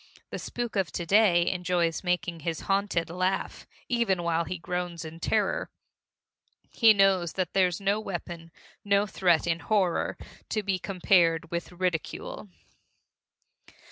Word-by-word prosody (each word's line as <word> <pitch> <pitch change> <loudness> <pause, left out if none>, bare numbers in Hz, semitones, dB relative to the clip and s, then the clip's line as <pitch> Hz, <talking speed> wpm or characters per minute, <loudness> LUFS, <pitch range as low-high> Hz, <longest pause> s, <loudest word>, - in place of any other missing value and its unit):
The - - -4
spook 240 -2 -5
of 190 -7 0
to 175 - -3
day 185 -3 +4
enjoys 180 -2 0
making 180 -1 -1
his 160 +1 -3
haunted 195 -4 0
laugh 185 +2 -2 0.2
even 230 -8 +1
while 170 0 0
he 185 - -4
groans 175 0 -4
in 160 +1 -9
terror. - - 0 1.0
He 225 -2 +6
knows 195 -4 +3
that 185 -3 -2
there's 180 -3 +2
no 200 +1 +1
weapon, 175 -4 -6 0.3
no 200 0 +3
threat, 180 -4 +2
in 165 -1 0
horror, 185 +1 0 0.3
to 215 - -1
be 190 -2 -1
compared 170 -3 +2
with 170 +1 -4
ridicule. 180 +3 -3
180 Hz, 135 wpm, -27 LUFS, 170-195 Hz, 1.0 s, He